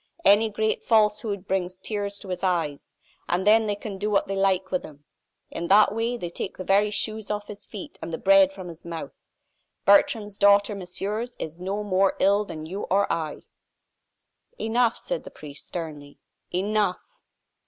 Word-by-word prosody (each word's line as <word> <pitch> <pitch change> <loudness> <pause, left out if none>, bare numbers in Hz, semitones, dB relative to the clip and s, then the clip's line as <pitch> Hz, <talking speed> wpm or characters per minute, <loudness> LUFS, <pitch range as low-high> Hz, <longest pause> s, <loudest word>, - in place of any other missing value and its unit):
Any 210 +3 +6
great 215 +1 -1
falsehood 210 -3 +2
brings 185 -1 -1
tears 205 0 -3
to 195 - -10
his 180 0 -4
eyes, 165 -6 -1 0.3
and 180 +2 0
then 220 +1 +5
they 205 - 0
can 200 -1 -7
do 210 +2 -1
what 200 -1 +2
they 195 - -2
like 190 -1 +1
with 185 - 0
him. 145 -1 -13 0.5
In 170 - -4
that 205 +2 +6
way 230 +2 -1
they 175 -7 -5
take 185 - -5
the 185 - -5
very 200 +3 +3
shoes 215 0 -2
off 210 0 -2
his 205 -1 -10
feet 295 - -9
and - - -5
the 160 - -2
bread 195 0 +5
from 190 -2 -9
his 170 -1 -10
mouth. 170 -1 -8 0.6
Bertrande's 205 -1 +3
daughter, 200 +1 +5
messieurs, 205 +5 -4
is 160 +2 -6
no 195 +3 -3
more 195 -1 +2
ill 200 +2 +3
than 155 -5 -7
you 190 +5 -5
or 200 +1 +2
I!" 155 -2 -4 1.2
"Enough," 235 +1 +2
said - - -4
the - - -9
priest, 150 -1 -11
sternly, 150 -4 -7 0.3
"enough." 205 - -1
200 Hz, 175 wpm, -25 LUFS, 180-210 Hz, 1.2 s, Any